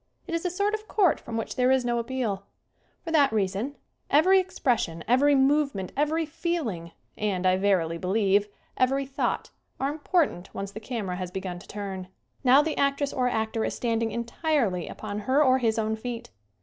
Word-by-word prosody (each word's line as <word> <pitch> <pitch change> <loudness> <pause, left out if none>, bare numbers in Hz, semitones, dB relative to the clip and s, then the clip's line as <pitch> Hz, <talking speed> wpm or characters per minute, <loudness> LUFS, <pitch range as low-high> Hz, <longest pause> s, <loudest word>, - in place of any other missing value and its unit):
It 340 - -6
is 335 - -1
a - - +2
sort 405 +4 0
of 430 0 -4
court 380 -7 +3
from 230 -1 -6
which 225 - -3
there 250 0 +3
is 260 -1 +3
no 240 -1 +1
appeal. 230 -5 -3 0.6
For 330 - -5
that 290 -4 +4
reason 210 +6 -1 0.4
everv 370 +6 +6
exoression, 220 - -1
every 280 +4 +4
movement, 275 -8 +2
every 305 +3 +1
feeling 290 - -3 0.3
and, 195 -3 -1
I 185 0 +5
verily 185 -4 +1
be 180 - -5
lieve, 200 0 +3 0.3
every 270 +2 +2
thought 270 +1 -2 0.3
are 275 +1 0
important 300 - 0
once 195 0 -4
the 220 - -7
camera 215 -6 -4
has 185 -1 -4
begun 185 -1 -5
to - - -15
turn. 195 -3 -5 0.4
Now 265 +3 +6
the 315 0 -2
actress 280 0 +1
or 250 -1 +1
actor 220 -1 -1
is - - -2
standing 230 -1 0
entirely 235 - -1
upon 210 -1 -5
her 260 +8 +3
or 260 -1 +4
his 225 -3 +1
own 220 0 0
feet. 235 +1 -6
235 Hz, 185 wpm, -27 LUFS, 200-285 Hz, 0.6 s, everv